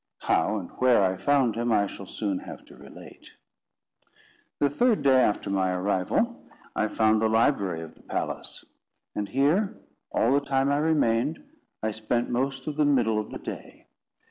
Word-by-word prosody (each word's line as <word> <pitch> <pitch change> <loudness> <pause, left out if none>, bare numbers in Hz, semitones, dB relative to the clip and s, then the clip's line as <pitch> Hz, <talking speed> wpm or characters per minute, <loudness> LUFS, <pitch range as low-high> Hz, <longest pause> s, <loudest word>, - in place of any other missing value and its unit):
How 110 - +1
and 90 -4 -7
where 125 -5 +4
I 95 0 +1
found 135 +1 +2
him, 120 +1 -1
I 105 -2 +3
shall 100 -1 -9
soon 100 -3 -3
have - - -10
to - - -16
relate. - - -14 1.2
The 145 - +3
third 225 - +1
day 130 -2 +5
after 105 -3 0
my 95 -1 +1
arrival, 100 - 0 0.3
I 110 - +1
found 110 0 +2
the 110 - +2
library 100 - +1
of 80 -1 -9
the - - -21
palace; - - -5 0.5
and 105 -1 -3
here, 155 +10 +1 0.3
all 120 +4 +2
the 140 - +3
time 135 0 +1
I 145 - +2
remained, 150 - +1 0.4
I 110 - 0
spent 110 +3 -2
most 135 +2 -1
of 150 -1 -4
the 155 - +3
middle 120 -7 +2
of 105 - -5
the - - -6
day. - - -9
120 Hz, 170 wpm, -26 LUFS, 105-140 Hz, 1.2 s, day